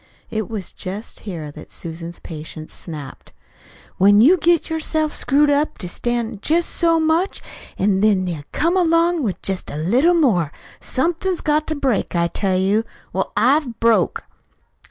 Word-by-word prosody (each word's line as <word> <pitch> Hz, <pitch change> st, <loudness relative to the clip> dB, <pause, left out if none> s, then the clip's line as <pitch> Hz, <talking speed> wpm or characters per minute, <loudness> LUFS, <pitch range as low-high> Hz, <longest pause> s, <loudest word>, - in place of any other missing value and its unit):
It 220 Hz, -1 st, -3 dB
was 210 Hz, -5 st, -6 dB
just 200 Hz, +4 st, -7 dB
here 160 Hz, -5 st, -6 dB
that 155 Hz, +1 st, -12 dB
Susan's 165 Hz, +1 st, -7 dB
patience 155 Hz, -1 st, -8 dB
snapped. 150 Hz, -5 st, -9 dB, 0.7 s
"When 205 Hz, +2 st, +6 dB
you 285 Hz, +12 st, +7 dB
get 340 Hz, 0 st, +2 dB
yourself 315 Hz, -1 st, -1 dB
screwed 290 Hz, +2 st, +2 dB
up 290 Hz, +2 st, +1 dB
to 180 Hz, -, -6 dB
stand 235 Hz, +2 st, -3 dB
jest 335 Hz, +6 st, +1 dB
so 330 Hz, -1 st, +3 dB
much, 320 Hz, +4 st, +1 dB, 0.4 s
an' 195 Hz, 0 st, +2 dB
then 205 Hz, -3 st, +3 dB
they 165 Hz, -5 st, -4 dB
come 335 Hz, +4 st, +1 dB
along 335 Hz, -1 st, +3 dB
with 210 Hz, -8 st, -2 dB
jest 190 Hz, -1 st, -3 dB
a -, -, -6 dB
little 250 Hz, -, +3 dB
more, 200 Hz, -, +2 dB, 0.3 s
somethin's 345 Hz, +6 st, -1 dB
got 305 Hz, 0 st, +1 dB
to 315 Hz, -, -1 dB
break, 265 Hz, -10 st, -1 dB
I 170 Hz, 0 st, +2 dB
tell 190 Hz, +1 st, 0 dB
you. 200 Hz, +4 st, +2 dB, 0.3 s
Well, 190 Hz, -, -1 dB
I've 250 Hz, +1 st, +2 dB
broke." 230 Hz, -1 st, +2 dB
230 Hz, 155 wpm, -20 LUFS, -, 0.7 s, you